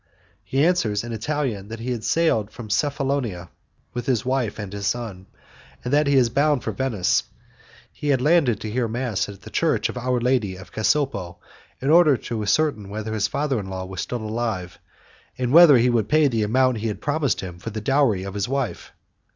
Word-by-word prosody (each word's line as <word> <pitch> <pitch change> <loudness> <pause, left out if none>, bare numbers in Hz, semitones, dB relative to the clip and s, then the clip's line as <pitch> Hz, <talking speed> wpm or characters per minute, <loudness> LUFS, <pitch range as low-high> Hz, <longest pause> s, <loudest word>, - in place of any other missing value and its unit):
He 135 +3 +1
answers 115 - +1
in 120 -1 -6
Italian 115 -4 -2
that 115 +1 -7
he 125 +2 -3
has 115 -3 -3
sailed 135 -11 +2
from 110 -1 -9
Cephalonia 135 - -1 0.4
with 120 -1 -5
his 125 -5 +1
wife 130 -4 -1
and 100 -2 -6
his 100 0 -3
son, 100 -4 -4 0.6
and 125 - -2
that 150 0 +3
he 140 - +3
is 130 -3 +5
bound 145 +1 +2
for - - -2
Venice; 120 -9 +1 0.7
he 150 - -6
had 140 -3 +3
landed 140 - +3
to 110 - -4
hear 120 +1 0
mass 115 -3 -2
at 100 -2 -11
the - - -11
Church - - +1
of - - -6
Our 125 0 0
Lady 120 -6 0
of 95 0 -12
Casopo, 110 -8 0 0.4
in 135 +3 0
order 160 -5 +6
to 115 -2 -5
ascertain 105 -2 0
whether 110 +1 -4
his 105 -1 +1
father 140 -2 -1
in 95 -2 -6
law 95 -1 -5
was 95 0 -5
still 120 -3 -4
alive, 110 -5 -3 0.6
and 125 0 -1
whether 165 -5 +9
he 120 +1 +3
would 110 -3 0
pay 155 0 +4
the 115 -4 0
amount 125 +2 +2
he 115 - -2
had 105 - -4
promised 145 -4 0
him 90 -2 -8
for 115 - -6
the 110 0 -5
dowry 120 -5 +2
of 95 0 -6
his 100 +2 -2
wife. 135 -3 -3
120 Hz, 205 wpm, -23 LUFS, 105-135 Hz, 0.7 s, whether